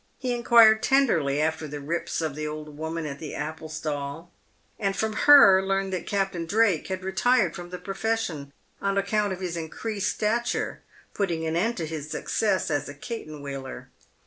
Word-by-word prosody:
He 250 -2 -2
inquired 230 -2 +6
tenderly 165 - +2
after 160 0 -1
the 145 0 -6
rips 165 +4 -3
of 160 -3 -2
the 155 +1 -4
old 150 -1 -7
woman 160 +1 -4
at 140 -1 -6
the 155 - -6
apple 155 +2 -5
stall, 155 +1 -5 0.5
and 195 -2 0
from 220 0 -1
her 215 -8 +8
learned 195 0 -1
that 185 - -4
Captain 195 -4 -1
Drake 205 -4 +2
had 185 -1 -4
retired 190 0 +2
from 175 0 -8
the 180 - -6
profession, 195 -8 -3 0.3
on 200 0 0
account 205 +1 +1
of 190 0 -5
his 180 -2 -3
increased 200 +6 -3
stature 230 +3 -1 0.3
putting 170 -5 -1
an 160 0 -1
end 225 +8 0
to 165 - -2
his 155 -1 -6
success 195 +1 0
as 145 -1 -1
a 145 - -8
cat 230 - -6
en 150 -2 -9
wheeler. 135 -2 -7
175 Hz, 180 wpm, -26 LUFS, 155-210 Hz, 0.5 s, her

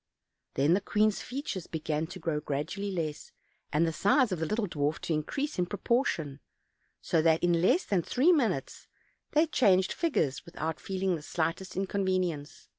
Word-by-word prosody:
Then 145 +5 +3
the 195 - +2
queen's 215 +1 +1
features 250 - -5
began 155 0 -2
to 180 +3 -8
grow 160 -3 -1
gradually 150 +8 -3
less, 160 -5 -4 0.4
and 155 +3 +3
the 165 - -1
size 245 - +3
of 180 - -1
the 160 - -1
little 215 +2 0
dwarf 150 -2 -1
to 165 - -1
increase 275 - -2
in 175 - +1
proportion; 180 - -1 0.6
so 165 - +2
that 160 +1 +3
in 170 -1 +3
less 260 - +3
than 195 -4 +1
three 260 - +3
minutes 230 - 0 0.5
they 310 +1 +5
changed 190 - +3
figures 160 - 0
without 160 -1 -4
feeling 190 -1 -1
the - - -10
slightest 165 +4 -2
inconvenience. 185 -6 -1
180 Hz, 165 wpm, -29 LUFS, 160-205 Hz, 0.6 s, they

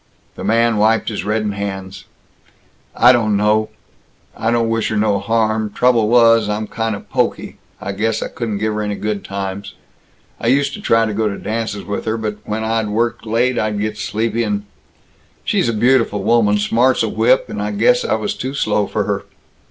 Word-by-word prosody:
The - - -8
man 115 +2 +2
wiped 110 +2 +2
his 105 -5 -4
reddened 105 0 -1
hands. 95 -1 -6 0.9
"I 125 - +7
don't 110 -4 +2
know 105 +1 +2 0.7
I 110 - -1
don't 115 -1 +1
wish 115 0 0
her 110 - -1
no 105 -1 +2
harm. 110 +1 0
Trouble 120 -2 +2
was, 115 -2 +5
I'm 105 +1 -2
kind 115 0 -2
of 105 - -11
pokey. - - -1 0.2
I 100 - -4
guess 110 +3 -1
I - - -3
couldn't 110 -4 -4
give 110 +1 -1
her 105 - -2
any 105 -1 -2
good 105 -1 -3
times. 100 0 -5 0.6
I - - -3
used 140 +1 +2
to 210 - -7
try 115 - +3
to 110 - -3
go 110 +1 0
to 100 - -5
dances 110 -2 -3
with 100 - -4
her, 110 +1 -1
but 105 -2 -3
when 110 +1 -3
I'd 110 -1 0
worked 115 +2 -1
late, 120 +3 +1
I'd 105 -1 -1
get 105 +1 -2
sleepy 110 +2 -2
and 105 -2 -2 0.8
She's 120 - +1
a - - +2
beautiful 115 -2 +2
woman, 110 -3 +3
smart 120 +5 +2
's - - +1
a - - 0
whip, - - +2
and - - -5
I - - -2
guess - - +2
I - - +1
was 205 - -2
too 135 +2 -5
slow 105 -5 0
for - - -1
her. - - -3
110 Hz, 200 wpm, -18 LUFS, 105-115 Hz, 0.9 s, I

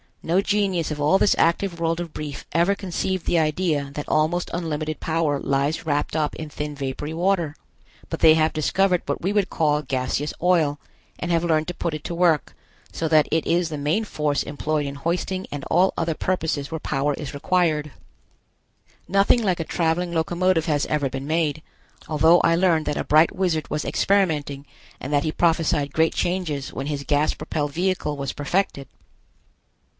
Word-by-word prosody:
No 170 +3 +2
genius 200 -5 0
of 150 -1 -4
all 150 +6 +4
this - - +4
active 170 +1 +1
world 165 0 0
of 170 -2 -5
Brief 145 -2 -6
ever 170 +4 +3
conceived 190 -1 -3
the 175 - +2
idea 155 -3 0
that 150 - -5
almost 160 +3 +1
unlimited 155 -2 -3
power 160 -3 0
lies 140 +4 -1
wrapped 145 0 -1
up 155 -2 0
in 155 -1 -6
thin 150 0 -5
vapory 140 +2 -4
water. 170 -3 0 0.5
But - - -4
they 160 -1 +7
have 160 0 +2
discovered 180 +4 +1
what - - -3
we 190 - 0
would 205 -3 +1
call 150 -2 +1
gaseous 130 +2 -2
oil, 165 -5 +2 0.4
and 175 - -2
have 165 0 +2
learned 160 -2 +1
to - - -3
put 170 - -2
it 155 - -7
to 170 - -4
work, 170 -4 +2 0.4
so 165 - -2
that 155 -1 +4
it 160 0 +1
is 170 0 +1
the 150 -2 -5
main 155 +10 +1
force 150 -8 -1
employed 150 +1 -2
in 140 - -5
hoisting 180 +5 -2
and 145 -1 -5
all 185 +2 +3
other 165 -1 0
purposes 160 -6 -1
where 160 - -3
power 145 0 -1
is 150 -3 -7
required. 155 -1 +1 1.2
Nothing 200 +5 +3
like 185 -4 +1
a - - 0
traveling 170 +2 -1
locomotive 170 +1 +1
has 150 -4 0
ever 145 -3 0
been 135 +2 -5
made, 155 -1 0 0.5
although 160 +3 +5
I 165 - +3
learned 170 -3 +2
that 150 - -1
a - - -1
bright 155 +2 +4
wizard 175 -5 -1
was 150 0 -2
experimenting 150 -8 0 0.3
and 140 - -5
that 145 0 +3
he 155 - -1
prophesied 160 -4 +1
great 160 0 +2
changes 170 -7 -2
when 135 - -4
his 145 -2 -3
gas 145 +2 +1
propelled 150 -2 -3
vehicle 175 -4 -1
was 140 -1 -3
perfected. 145 -2 -1
160 Hz, 180 wpm, -23 LUFS, 150-175 Hz, 1.2 s, they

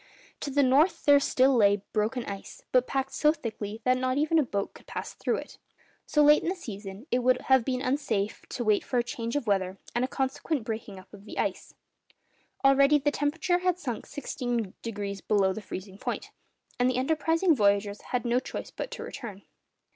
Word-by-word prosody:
To 285 - -4
the 285 +1 +3
north 275 +7 +3
there 285 -1 +7
still 270 -1 +3
lay 205 -3 +4
broken 225 +3 0
ice, 195 -1 -8
but 255 0 +3
packed 270 0 -2
so 300 - +4
thickly 220 -7 -6
that 255 0 +3
not 255 +1 0
even 310 +2 +3
a - - +4
boat 200 -5 -3
could - - -16
pass - - -5
through - - -1
it. - - -8 0.5
So 300 - +4
late 295 +1 +7
in - - -1
the 375 - -1
season, 205 - -8
it 245 - +3
would 250 +1 +3
have 265 -2 +4
been 255 +1 -2
unsafe 240 -7 -1
to 245 - -3
wait 215 -2 +3
for 250 - -2
a 240 - +3
change 235 0 -4
of 290 - -1
weather 195 -2 0 0.2
and 240 - +1
a - - +1
consequent 270 +1 -2
breaking 220 -3 -5
up 185 +2 -15
of 205 0 -13
the - - -9
ice. - - -2 0.9
Already 275 +2 +6
the 290 +1 +1
temperature 320 +5 0
had 365 -1 +1
sunk 245 -10 -5
sixteen 245 -7 -3
degrees 200 -3 -4
below 195 -3 +2
the 220 - -6
freezing 195 0 -8
point; - - -4 0.5
and 245 +1 +4
the 255 - 0
enterprising 320 +5 +2
voyagers 205 -2 +2
had 250 -1 -3
no 240 +1 +2
choice - - -7
but - - -5
to - - -7
return. 215 -8 -8
250 Hz, 200 wpm, -28 LUFS, 210-280 Hz, 0.9 s, there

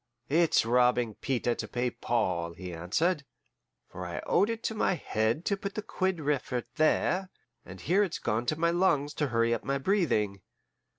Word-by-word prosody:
"It's 165 -3 +3
robbing 125 -1 +3
Peter 120 +1 -1
to - - -5
pay 125 0 -1
Paul," 85 -10 -1
he 90 0 -7
answered; 150 - 0 0.6
"for 90 - -8
I 90 -1 -5
owed 205 - +3
it 230 0 -3
to - - -1
my 210 -3 +1
head 115 +1 -1
to 200 - +1
put 200 0 -6
the 215 - -3
quid 185 -2 -1
refert 140 -4 -1
there, 180 +4 +2 0.4
and 95 0 -10
here 185 +5 +2
it's 190 -5 0
gone 115 +3 -1
to 155 - 0
my 170 +1 +3
lungs 150 -5 +2
to 150 - +3
hurry 115 -1 +2
up 115 - -2
my 140 0 0
breathing. 130 - +1
135 Hz, 180 wpm, -29 LUFS, 115-175 Hz, 0.6 s, It's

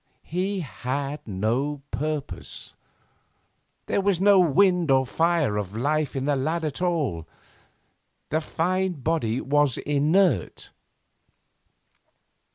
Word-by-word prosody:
He 185 +3 -2
had 140 0 -4
no 120 +9 -1
purpose. 145 - -4 1.1
There - - 0
was 195 -3 +1
no 200 0 +6
wind 180 0 +3
or 130 -1 +4
fire 160 -6 +1
of 105 0 -4
life 150 +4 0
in 135 0 -2
the 145 0 +2
lad 160 +5 -1
at 150 +3 -4
all. 145 - -1 1.0
The 155 +1 0
fine 185 +4 -1
body 140 -6 -1
was 145 -2 +2
inert. 150 - +1
150 Hz, 105 wpm, -25 LUFS, 130-175 Hz, 1.1 s, no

